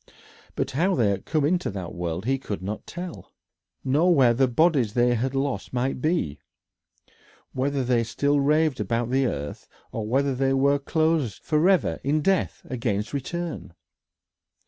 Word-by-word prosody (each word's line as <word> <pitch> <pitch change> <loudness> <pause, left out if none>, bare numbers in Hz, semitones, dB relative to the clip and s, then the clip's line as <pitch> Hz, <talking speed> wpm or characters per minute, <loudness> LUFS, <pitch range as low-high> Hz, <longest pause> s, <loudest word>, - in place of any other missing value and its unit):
But 135 0 -2
how 175 +8 +1
they 110 -6 +2
had 100 - -4
come 155 -3 +1
into 180 +3 +1
that 95 -4 -6
world 85 +2 -4
he 135 +2 +1
could 105 -7 -5
not 105 +3 -5
tell, 175 -1 -8 0.5
nor 155 +7 +3
where 125 -4 +5
the 130 +2 +3
bodies 130 -4 +2
they 120 0 +3
had 130 +3 -1
lost 135 -9 -2
might 125 +1 -1
be, 140 - 0 1.1
whether 135 +1 0
they 120 -2 +2
still 140 +6 +1
raved 150 0 +2
about 115 +3 -1
the 135 0 +2
earth, 75 -6 -5 0.2
or 110 -2 -4
whether 135 +4 +1
they 135 +1 +1
were 140 +1 +3
closed 155 -5 0
forever 170 +5 +2
in 150 +3 +1
death 195 +1 0
against 115 -4 -2
return. 160 - -4
135 Hz, 155 wpm, -25 LUFS, 115-150 Hz, 1.1 s, where